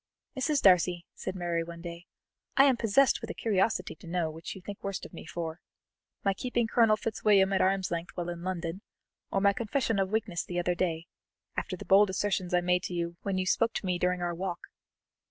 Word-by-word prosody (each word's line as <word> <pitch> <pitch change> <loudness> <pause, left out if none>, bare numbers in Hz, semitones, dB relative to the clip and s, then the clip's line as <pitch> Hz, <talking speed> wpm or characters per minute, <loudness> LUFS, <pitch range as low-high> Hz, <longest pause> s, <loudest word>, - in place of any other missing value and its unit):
"Mrs. 285 +2 +1
Darcy," 180 -2 +4
said 185 - -5
Mary 170 -2 -1
one 170 0 -9
day, 170 +1 -8 0.5
"I 270 - +8
am 275 -2 +5
possessed 235 +4 +3
with - - -6
a - - -5
curiosity 215 -1 +1
to 175 - -13
know 165 -2 -1
which 160 +1 -7
you 190 - -10
think 200 +1 -8
worst 195 -1 -3
of - - -12
me - - -9
for 165 0 -5 0.6
my 195 - +2
keeping 240 +3 -1
Colonel 225 -1 +4
Fitzwilliam 200 -3 +3
at 190 - +3
arm's 190 -1 +1
length 170 0 -2
while 175 0 -2
in 175 -1 -5
London, 180 0 -3 0.5
or 195 - +1
my 200 0 +5
confession 225 0 0
of 190 -1 +1
weakness 205 -5 -1
the 175 - -5
other 175 0 +1
day, 170 -2 -1 0.5
after 185 - -3
the 205 - -9
bold 195 +2 +6
assertions 190 -1 -1
I 180 0 +3
made 180 +1 +1 0.3
when 195 -2 -1
you 185 - 0
spoke 230 +5 +2
to - - -3
me 180 -1 0
during 180 0 +1
our 175 0 -1
walk?" 175 0 -5
185 Hz, 210 wpm, -29 LUFS, 175-205 Hz, 0.6 s, I